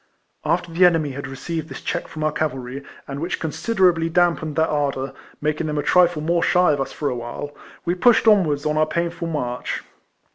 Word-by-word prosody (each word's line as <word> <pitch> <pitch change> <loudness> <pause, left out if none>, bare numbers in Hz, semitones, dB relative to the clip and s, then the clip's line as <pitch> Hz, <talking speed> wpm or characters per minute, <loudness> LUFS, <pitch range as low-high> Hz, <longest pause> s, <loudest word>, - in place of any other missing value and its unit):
After 170 +2 0
the 170 +3 +3
enemy 165 -5 +4
had 135 +1 -6
received 160 +4 -5
this - - -7
clieck 175 - -3
from 155 - -6
our 155 - +2
cavalry, 135 -3 -3 0.2
and 140 0 -5
which 170 +4 -2
considerably 175 -1 +1
damped 165 -3 +1
their 160 - +3
ardour, 140 -2 -1 0.3
making 155 +1 -1
them 150 -1 -2
a 145 - 0
trifle 175 -4 +3
more 170 +2 +1
shy 180 -1 +4
of 145 -2 0
us 135 - -3
for 150 - -3
awhile, 125 +4 -5 0.3
we 175 - +1
pushed 225 +5 +4
on 210 -3 +7
wards 145 -2 -2
on 150 0 +1
our 155 - +3
painful 170 +1 -2
march. 125 -6 -3
155 Hz, 195 wpm, -22 LUFS, 145-175 Hz, 0.3 s, on